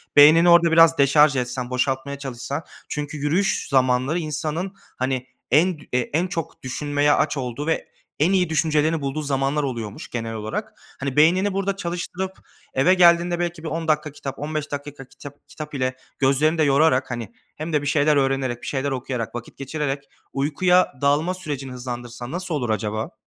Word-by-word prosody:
beynini 160 +4 +8
orada 170 -1 +6
biraz 165 0 +6
deşarj 145 +1 +5
etsen, 125 0 -2
boşaltmaya 130 +2 -1
çalışsan 140 +3 -5 0.3
çünkü 150 0 -4
yürüyüş 175 +8 0
zamanları 130 +3 +2
insanın, 160 +4 -3 0.2
hani, 130 0 -2 0.2
en 160 +3 +3
dü - - -15
en 155 +8 0
çok 165 -6 -5
düşünmeye 145 +2 0
aç 150 - +1
olduğu 130 +3 -4
ve 165 - -1 0.3
en 165 +6 +3
iyi 180 -3 +2
düşüncelerini 155 0 +1
bulduğu 140 +2 -2
zamanlar 140 +1 0
oluyormuş 115 -6 -5
genel 115 -1 -4
olarak. 110 0 -4 0.3
Hani, 135 -1 -3
beynini 185 +6 +4
burada 195 0 -1
çalıştırıp 180 +1 -4 0.4
eve 170 +8 +4
geldiğinde 175 -1 +4
belki 170 -2 -3
bir - - -4
10 165 +1 -3
dakika 155 -1 +1
kitap, 135 -2 -7
15 150 0 -4
dakika 145 -1 -6
ka 130 - -21
kitap 145 +1 -13
kitap 150 -1 -8
ile 130 -2 -1 0.2
gözlerini 145 +4 +3
de 155 - +3
yorarak, 140 -2 +3
hani, 120 -4 -5 0.2
hem 155 +2 -5
de 150 - +2
bir 145 - -4
şeyler 150 +1 +3
öğrenerek, 135 -3 0
bir - - -8
şeyler 140 0 -1
okuyarak, 125 -3 -4
vakit 120 -1 -8
geçirerek 140 0 -3 0.3
uykuya 180 +6 +2
dalma 145 +5 +2
sürecini 145 -8 -5
hızlandırsan 120 0 -6
nasıl 175 -2 -3
olur 125 -5 -2
acaba? 110 0 -2
145 Hz, 170 wpm, -23 LUFS, 130-160 Hz, 0.4 s, beynini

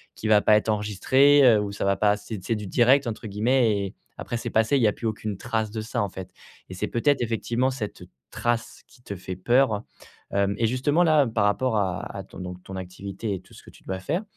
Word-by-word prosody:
qui 110 - -5
va 105 -1 +5
pas 105 - +5
être 110 - -2
enregistré. 120 +8 +4
Heu, 110 -4 +6
ou 100 -1 -4
ça 100 - -3
va 100 0 +2
pas 105 0 +3
c'est 105 -2 -8
c'est 115 - -1
«du 105 -2 -6
direct» 125 +6 +4
entre 115 0 -5
guillemets 110 +1 +2
et 95 - -5 0.2
après 120 - -4
c'est 120 0 -4
passé, 110 +5 +2
il - - +1
n'y 110 - +5
a 105 - +1
plus 115 - -4
aucune 105 -2 -4
trace 110 -2 -2
de 110 -1 -4
ça 110 - -2
en 100 - -3
fait 95 0 -8 0.4
et - - -7
c'est - - -2
peut-être, 140 +3 +1
effectivement, 120 +2 0
cette 110 -6 -6 0.3
trace 120 -1 -2
qui 125 - -22
te 100 - -6
fait 95 0 -7
peur. 120 +1 +2 0.5
Hem 100 0 +1
et 115 - +2
justement, 145 +8 +2
là, 155 -5 +4
par 110 -2 0
rapport 110 +3 +1
à 95 0 -2
à 95 - -5
ton - - -13
donc 90 0 -7
ton 95 - -9
activité 95 +3 -5
et 95 - -8
tout - - -21
ce - - -13
que - - -14
tu - - -20
dois 95 0 -4
faire. 165 - -2
110 Hz, 245 wpm, -25 LUFS, 100-120 Hz, 0.5 s, Heu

